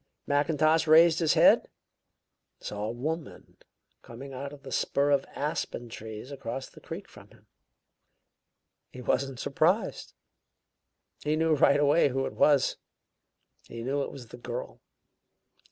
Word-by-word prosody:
Mackintosh 155 Hz, +2 st, +2 dB
raised 160 Hz, +1 st, +6 dB
his 165 Hz, -3 st, +2 dB
head -, -, +7 dB, 1.0 s
and -, -, -17 dB
saw 105 Hz, 0 st, -4 dB
a 110 Hz, -, -2 dB
woman 155 Hz, +7 st, -6 dB, 0.4 s
coming 135 Hz, +4 st, -10 dB
out 140 Hz, +2 st, -6 dB
of 145 Hz, -1 st, -13 dB
the 135 Hz, -, -9 dB
spur 140 Hz, +2 st, +1 dB
of 140 Hz, -1 st, +2 dB
aspen 145 Hz, -5 st, -3 dB
trees 110 Hz, +3 st, -8 dB
across 135 Hz, -1 st, -5 dB
the -, -, -17 dB
creek -, -, -8 dB
from -, -, -15 dB
him. -, -, -22 dB, 1.4 s
He 125 Hz, -, -10 dB
wasn't 135 Hz, 0 st, -1 dB
surprised; 165 Hz, +11 st, 0 dB, 1.1 s
he 150 Hz, +1 st, +1 dB
knew 160 Hz, 0 st, +2 dB
right 140 Hz, -1 st, +4 dB
away 145 Hz, +1 st, +4 dB
who 135 Hz, +1 st, -1 dB
it -, -, -5 dB
was; 145 Hz, -3 st, +3 dB, 0.9 s
he 115 Hz, 0 st, -7 dB
knew 140 Hz, +3 st, -1 dB
it -, -, -4 dB
was 125 Hz, -5 st, -11 dB
the -, -, -10 dB
girl. 120 Hz, -, -7 dB
140 Hz, 140 wpm, -28 LUFS, 125-155 Hz, 1.4 s, head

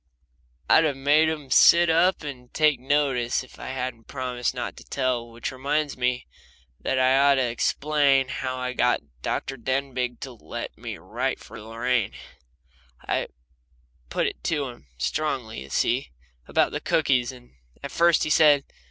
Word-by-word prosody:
I'd 160 Hz, -, +6 dB
have 145 Hz, -3 st, 0 dB
made 150 Hz, +3 st, +4 dB
them 150 Hz, -4 st, -5 dB
sit 170 Hz, 0 st, +7 dB
up 170 Hz, +2 st, +3 dB
and 125 Hz, -4 st, -8 dB
take 150 Hz, -4 st, +3 dB
notice 130 Hz, -3 st, +1 dB
if 130 Hz, -, -16 dB
I -, -, -7 dB
hadn't 130 Hz, -3 st, -4 dB
promised 125 Hz, -3 st, -2 dB
not 125 Hz, -, -4 dB
to -, -, -11 dB
tell. 125 Hz, -3 st, -2 dB
Which 115 Hz, 0 st, -5 dB
reminds 145 Hz, +3 st, -1 dB
me 125 Hz, 0 st, -1 dB, 0.5 s
that 135 Hz, -, -1 dB
I 130 Hz, 0 st, +4 dB
ought 140 Hz, 0 st, +5 dB
to 130 Hz, -, +2 dB
explain 135 Hz, +2 st, +2 dB
how 130 Hz, -1 st, -3 dB
I 125 Hz, 0 st, -3 dB
got 70 Hz, -, -1 dB
Dr. 135 Hz, -, -3 dB
Denbigh 130 Hz, -1 st, -2 dB
to 135 Hz, -, -6 dB
let 120 Hz, -, -7 dB
me -, -, -7 dB
write -, -, -3 dB
this -, -, -15 dB
for -, -, -10 dB
Lorraine. 115 Hz, 0 st, -1 dB, 0.9 s
I -, -, 0 dB, 0.8 s
put -, -, 0 dB
it -, -, -4 dB
to 145 Hz, -5 st, 0 dB
him 120 Hz, -, -14 dB
strongly, 130 Hz, -, -2 dB
you 70 Hz, -, -10 dB
see, 125 Hz, -, 0 dB, 0.4 s
about -, -, +2 dB
the -, -, -4 dB
cookies, 130 Hz, -5 st, +1 dB
and 125 Hz, -1 st, -15 dB, 0.3 s
at 140 Hz, -, -5 dB
first 170 Hz, -1 st, +4 dB
he 155 Hz, -, -1 dB
said. 150 Hz, -2 st, +5 dB
130 Hz, 165 wpm, -25 LUFS, 125-145 Hz, 0.9 s, sit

